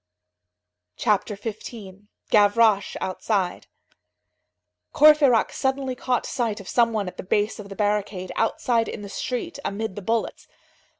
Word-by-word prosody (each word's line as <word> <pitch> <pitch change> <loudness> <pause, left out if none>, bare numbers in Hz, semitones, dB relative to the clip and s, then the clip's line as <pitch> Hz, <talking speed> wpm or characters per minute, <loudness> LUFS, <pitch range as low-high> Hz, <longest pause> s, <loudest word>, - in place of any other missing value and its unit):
CHAPTER 210 0 +1
XV—GAVROCHE 205 0 0
OUTSIDE 190 -1 -2 1.3
Courfeyrac 295 -6 +6
suddenly 265 -1 -1
caught 250 -1 -1
sight 230 -4 -2
of 200 - -11
some 235 -1 +3
one 210 -3 -2
at 180 - -8
the - - -6
base 205 +4 0
of 200 -1 -9
the 195 - -8
barricade, 205 -3 -1
outside 230 0 +1
in 205 - -6
the 200 - -8
street, 260 - -4
amid 205 -1 -3
the 205 - -6
bullets. 225 +3 -2
215 Hz, 125 wpm, -24 LUFS, 200-235 Hz, 1.3 s, Courfeyrac